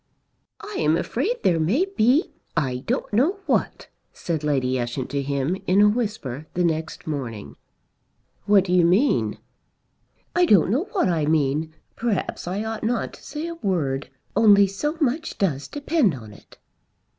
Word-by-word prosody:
"I 410 0 -7
am 155 +2 +3
afraid 395 - -2
there 170 -2 +3
may 215 - +2
be 295 - +2 0.3
I 130 -5 0
don't 250 -2 -2
know 295 - +2
what," - - -1 0.2
said 160 -4 -4
Lady 130 -3 0
Ushant 120 +2 -3
to 140 0 -1
him 140 +4 -1
in 185 +2 +4
a 210 - +7
whisper 205 - -2
the 180 - +1
next 160 -1 -2
morning. 115 - -5 0.9
"What 200 -2 +5
do 180 -2 -2
you 180 -1 +5
mean?" 190 +12 +2 1.0
"I 355 0 +4
don't 195 - +5
know 275 - +1
what - - +2
I 160 -4 0
mean. 155 +1 0 0.2
Perhaps 225 -6 -2
I 195 +4 -2
ought 220 0 -4
not 230 +1 -1
to - - -15
say 300 +2 -5
a 340 - -4
word. 155 - -2 0.3
Only 205 -2 +6
so 295 - -3
much 300 +3 -1
does 150 -8 -1
depend 290 - +1
on 110 -4 -11
it!" - - -18
185 Hz, 160 wpm, -23 LUFS, 150-240 Hz, 1.0 s, a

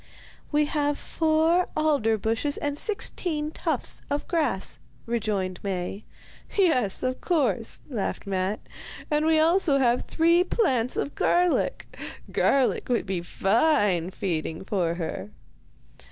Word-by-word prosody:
'We 300 0 +3
have 290 -1 0
four 325 +2 +2
alder 285 -8 +2
bushes 225 +7 0
and 290 -1 -2
sixteen 310 -4 -1
tufts - - -2
of 285 +1 -2
grass,' 295 - -1 0.3
rejoined 205 -6 -2
Maie. 195 +1 -4 0.5
'Yes, 255 - +3
of 255 0 -2
course,' 275 -9 0
laughed 230 -8 -3
Matte, 195 +1 -1 0.5
'and 300 +1 +2
we 320 - +4
have 315 0 +5
also 275 -9 +3
three 335 +2 +3
plants 260 - 0
of 285 - -2
garlic. 355 -1 +1 0.5
Garlic 270 -2 +2
would 240 -3 +1
be 190 -3 -2
fine 195 - +2
feeding 165 -4 -3
for 175 -5 0
her. 160 - -5
255 Hz, 120 wpm, -26 LUFS, 195-315 Hz, 0.5 s, have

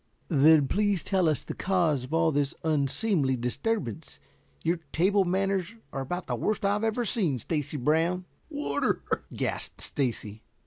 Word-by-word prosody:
"Then, 150 -1 +6
please 205 -1 +1
tell 185 -4 +2
us 150 - -1
the - - -5
cause 170 -9 +1
of 130 - -13
all 165 0 +3
this 145 -1 0
unseemly 150 0 +1
disturbance. 125 - -3 0.4
Your 170 +2 +1
table 195 +4 +3
manners 195 +2 0 0.2
are 135 - -2
about 175 +7 -4
the - - -2
worst 215 -1 -1
I 200 +1 +2
ever 225 +2 0
saw, 185 - +1
Stacy 150 +4 -3
Brown." 165 +7 +1 0.2
"Water," 295 -1 -1 0.3
gasped - - -3
Stacy. 115 -6 -2
165 Hz, 145 wpm, -28 LUFS, 140-195 Hz, 0.4 s, Then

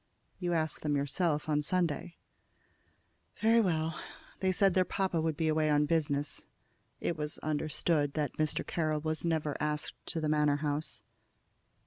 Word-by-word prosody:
"You 175 -2 -1
asked 160 -1 -1
them 150 -1 0
yourself 150 +2 0
on 150 -1 +2
Sunday." 170 +1 -1 1.2
"Very 230 +1 +5
well. 160 -5 0 0.4
They 190 -1 +2
said 195 0 +3
their 185 - +4
papa 180 -2 0
would 160 -2 -1
be 160 - +1
away 155 0 +2
on 150 0 +4
business." 145 -2 0 0.5
It 170 - -1
was 150 -1 -2
understood 155 -1 0
that 150 -4 -1
Mr. 155 -1 0
Carroll 155 -2 0
was 155 0 -1
never 160 -3 0
asked 150 0 -1
to 165 - -2
the 155 - -1
Manor 150 -1 +3
house. 145 +2 -2
155 Hz, 150 wpm, -32 LUFS, 150-170 Hz, 1.2 s, Very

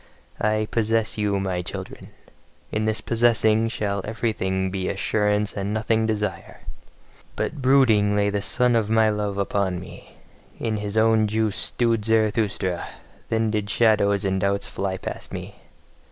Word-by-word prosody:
I 110 0 +1
POSSESS 115 -1 0
YOU, 100 -2 0
MY 95 -2 -2
CHILDREN! - - -8 0.6
In 110 0 -1
this 110 0 +1
possessing 115 -1 +2
shall 100 -3 -2
everything 95 -4 -2
be 95 -1 -2
assurance 105 +1 0
and 100 +1 -3
nothing 110 +1 +1
desire. 105 -4 -3 0.7
But 150 -3 -3
brooding 115 -6 +4
lay 100 0 +2
the 100 0 -1
sun 125 +4 +1
of 110 -2 +1
my 110 -1 +4
love 105 -1 -2
upon 100 -2 -1
me, 90 - -12 0.5
in 110 -2 -1
his 105 +1 -4
own 110 -1 +4
juice 110 -1 0
stewed 115 -3 +2
Zarathustra, 105 -5 0 0.5
then 110 -1 +1
did 105 -1 -2
shadows 105 -3 +2
and 95 -1 0
doubts 100 +1 0
fly 95 -1 -3
past - - -7
me. - - -7
105 Hz, 145 wpm, -23 LUFS, 100-110 Hz, 0.7 s, brooding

